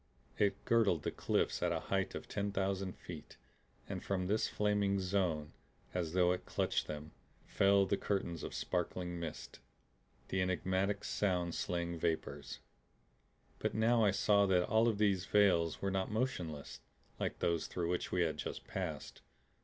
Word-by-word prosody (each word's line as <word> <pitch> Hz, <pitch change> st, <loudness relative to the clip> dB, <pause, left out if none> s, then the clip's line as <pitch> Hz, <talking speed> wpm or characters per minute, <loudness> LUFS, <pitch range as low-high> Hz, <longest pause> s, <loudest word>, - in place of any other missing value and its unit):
It 100 Hz, -1 st, +1 dB
girdled 105 Hz, -9 st, +3 dB
the -, -, -1 dB
cliffs -, -, 0 dB
at -, -, +2 dB
a -, -, 0 dB
height -, -, -1 dB
of -, -, -6 dB
ten 100 Hz, 0 st, -2 dB
thousand 95 Hz, -1 st, -1 dB
feet, 80 Hz, -4 st, -9 dB, 0.5 s
and -, -, -5 dB
from 95 Hz, -2 st, -1 dB
this 105 Hz, +4 st, +1 dB
flaming 105 Hz, -1 st, +1 dB
zone, 90 Hz, -6 st, 0 dB, 0.4 s
as 85 Hz, -3 st, -2 dB
though 90 Hz, -1 st, +4 dB
it 90 Hz, -, -2 dB
clutched -, -, 0 dB
them, 75 Hz, +1 st, -6 dB, 0.3 s
fell 100 Hz, 0 st, +4 dB
the 100 Hz, -, +1 dB
curtains 85 Hz, -5 st, -2 dB
of -, -, -5 dB
sparkling 90 Hz, 0 st, -2 dB
mist, 80 Hz, -2 st, -6 dB, 0.7 s
the 95 Hz, -, 0 dB
enigmatic, 95 Hz, +2 st, 0 dB
sound 90 Hz, -4 st, 0 dB
slaying 85 Hz, -1 st, -2 dB
vapors. 80 Hz, -1 st, -2 dB, 1.0 s
But -, -, -1 dB
now 115 Hz, +1 st, +4 dB
I 105 Hz, -, +5 dB
saw 100 Hz, +1 st, +4 dB
that 90 Hz, -2 st, +3 dB
all 110 Hz, +2 st, +4 dB
of 110 Hz, -3 st, +1 dB
these 100 Hz, -4 st, +2 dB
veils 90 Hz, -6 st, +3 dB
were 100 Hz, -, +1 dB
not 95 Hz, 0 st, -1 dB
motionless 90 Hz, -, -3 dB, 0.4 s
like -, -, -2 dB
those 85 Hz, -2 st, 0 dB
through 85 Hz, -2 st, -2 dB
which 90 Hz, -, -2 dB
we 90 Hz, -, +2 dB
had 80 Hz, -2 st, -1 dB
just -, -, -5 dB
passed. -, -, -5 dB
95 Hz, 160 wpm, -35 LUFS, 85-100 Hz, 1.0 s, I